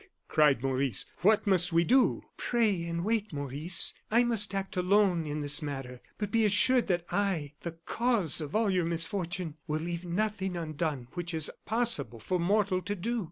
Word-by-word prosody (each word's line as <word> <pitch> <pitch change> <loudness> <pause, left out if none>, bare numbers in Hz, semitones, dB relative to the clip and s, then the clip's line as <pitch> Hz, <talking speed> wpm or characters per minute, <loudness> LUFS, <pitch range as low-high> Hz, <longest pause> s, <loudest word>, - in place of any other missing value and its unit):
cried 145 -6 +3
Maurice; 135 -4 -1
"what 210 +4 +3
must 180 -4 +3
we 165 +1 +3
do?" 255 +8 +3
"Pray 215 -8 0
and 170 +1 -3
wait, 220 -1 -1
Maurice. 145 +4 +1 0.2
I 235 +3 +4
must 225 -4 +2
act 195 0 -4
alone 180 -3 +2
in 150 +1 -3
this 145 0 +1
matter, 135 -4 -6 0.2
but 205 -1 -4
be 225 +1 +3
assured 230 +4 +3
that 175 -3 0
I 180 -8 -1
the 170 - -5
cause 190 - +1
of 150 +3 -6
all 215 -2 +2
your 180 -2 +1
misfortune 170 -1 -3
will 155 +1 -2
leave 170 +1 -4
nothing 190 0 -2
undone 155 -5 -3
which 175 -1 -4
is 155 -2 -1
possible 225 - +1
for 180 +11 -2
mortal 195 +1 +1
to 205 +3 -4
do." 230 +6 -2
175 Hz, 175 wpm, -29 LUFS, 155-205 Hz, 0.2 s, I